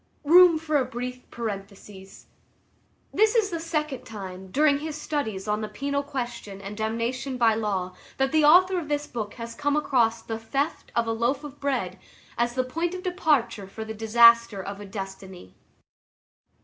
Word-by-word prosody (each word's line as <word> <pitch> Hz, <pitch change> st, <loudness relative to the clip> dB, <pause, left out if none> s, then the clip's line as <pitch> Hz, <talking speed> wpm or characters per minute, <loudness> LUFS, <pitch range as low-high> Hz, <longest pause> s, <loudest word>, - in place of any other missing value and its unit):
Room 345 Hz, +2 st, +7 dB
for 310 Hz, -1 st, 0 dB
a 270 Hz, -, +2 dB
brief 250 Hz, +1 st, -6 dB
parenthesis. 200 Hz, -3 st, -8 dB, 0.9 s
This 435 Hz, +3 st, +3 dB
is 425 Hz, -4 st, +2 dB
the 335 Hz, -, -2 dB
second 305 Hz, -4 st, -3 dB
time, 190 Hz, -3 st, -8 dB
during 285 Hz, +6 st, +3 dB
his 310 Hz, 0 st, -5 dB
studies 220 Hz, -11 st, -3 dB
on 210 Hz, +1 st, 0 dB
the 215 Hz, -, -3 dB
penal 280 Hz, +1 st, -2 dB
question 240 Hz, -8 st, -6 dB
and 200 Hz, +1 st, -7 dB
damnation 235 Hz, +4 st, -2 dB
by 230 Hz, -2 st, +4 dB
law, 195 Hz, -4 st, -2 dB, 0.2 s
that 270 Hz, 0 st, +1 dB
the 315 Hz, -1 st, +3 dB
author 365 Hz, +4 st, +6 dB
of 320 Hz, -, -7 dB
this 295 Hz, 0 st, -1 dB
book 220 Hz, -6 st, -5 dB
has 230 Hz, -1 st, -7 dB
come 290 Hz, +3 st, 0 dB
across 235 Hz, -6 st, +1 dB
the 225 Hz, -1 st, -5 dB
theft 275 Hz, +7 st, -3 dB
of 235 Hz, -, +2 dB
a 225 Hz, -, -1 dB
loaf 240 Hz, +5 st, 0 dB
of 290 Hz, -1 st, -10 dB
bread 280 Hz, -2 st, -2 dB, 0.4 s
as 240 Hz, 0 st, 0 dB
the 255 Hz, -, +1 dB
point 335 Hz, +7 st, -2 dB
of 365 Hz, -, -7 dB
departure 305 Hz, -, 0 dB
for 220 Hz, +3 st, -7 dB
the 220 Hz, -, -5 dB
disaster 230 Hz, 0 st, +5 dB
of 200 Hz, +1 st, -6 dB
a 205 Hz, -, -8 dB
destiny. 190 Hz, -, -8 dB
240 Hz, 175 wpm, -26 LUFS, 215-295 Hz, 0.9 s, Room